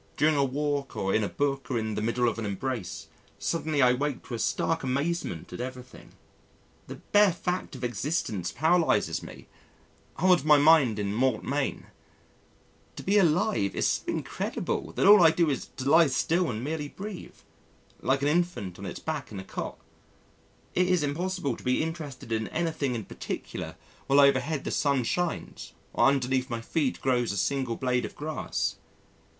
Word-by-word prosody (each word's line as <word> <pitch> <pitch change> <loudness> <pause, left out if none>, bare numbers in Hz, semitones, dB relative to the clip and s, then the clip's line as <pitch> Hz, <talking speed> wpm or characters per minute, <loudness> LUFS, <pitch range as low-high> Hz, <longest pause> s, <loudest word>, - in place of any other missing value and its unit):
During 155 +1 +3
a 140 - +3
walk 140 0 -2
or 95 0 -1
in 110 - +2
a 100 - -1
book 140 -1 -1
or 125 - 0
in 110 -1 -2
the 105 - -2
middle 120 +2 +1
of 115 - -1
an 115 - -3
embrace, 105 0 -4 0.3
suddenly 155 -4 0
I 125 - +6
awake 140 +1 -2
to - - -8
a 115 - -3
stark 165 +8 0
amazement 140 - -2
at - - -5
everything. 125 0 -9 0.7
The - - -7
bare 205 -2 +3
fact 180 -2 -3
of 130 - -9
existence 120 - -2
paralyses 165 +4 +2
me - - -11 0.7
holds 180 -3 +4
my 150 -1 +6
mind 145 -7 +5
in 100 -1 -2
mort 130 +4 +1
main. 140 0 -2 1.1
To - - -8
be 205 +2 +3
alive 170 - +2
is - - 0
so - - +1
incredible - - -3
that - - +1
all 205 0 +9
I 165 - +8
do 165 -1 +2
is 135 - -3
to 130 - -3
lie 160 +3 +6
still 165 +6 +1
and 110 0 -4
merely 150 +1 -3
breathe 195 +4 -8 0.7
like 135 +2 +1
an - - +3
infant 150 - -1
on 100 - -6
its 85 - -6
back 155 -6 -4
in 100 - -6
a - - -6
cot. - - -6 1.0
It 180 0 +2
is 180 -4 +2
impossible 155 -1 -1
to - - -13
be 125 +4 +1
interested 155 -7 -6
in 110 -1 0
anything 155 -6 -1
in 110 -4 -4
particular - - -6 0.3
while 140 +1 +5
overhead 140 +1 +3
the - - -3
sun 140 -3 +1
shines 175 +8 -3 0.2
or - - +4
underneath 130 -1 +1
my 115 -2 -3
feet 135 +3 -1
grows 125 -4 +1
a 100 - -4
single 130 +1 0
blade 125 0 0
of - - -6
grass. 155 +1 -3
140 Hz, 180 wpm, -28 LUFS, 125-160 Hz, 1.1 s, all